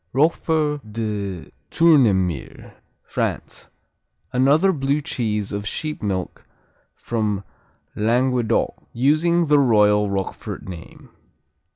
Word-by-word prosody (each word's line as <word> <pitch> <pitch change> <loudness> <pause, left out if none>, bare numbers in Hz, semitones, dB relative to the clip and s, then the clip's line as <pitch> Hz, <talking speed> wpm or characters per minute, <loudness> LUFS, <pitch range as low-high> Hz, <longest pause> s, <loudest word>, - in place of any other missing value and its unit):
Roquefort 150 +1 +1
de 105 -5 -4 0.2
Tournemire 105 - +2 0.3
France - - -4 0.6
Another 145 +9 +4
Blue 140 -1 0
cheese 105 -7 -2
of 100 0 -4
sheep 155 +5 -4
milk 95 -3 -3 0.5
from 105 -4 -2 0.5
Languedoc, 120 +2 0
using 155 +7 +2
the 150 -1 +4
royal 105 -5 +4
Roquefort 95 -1 -5
name. 85 -3 -10
120 Hz, 85 wpm, -22 LUFS, 105-150 Hz, 0.6 s, Another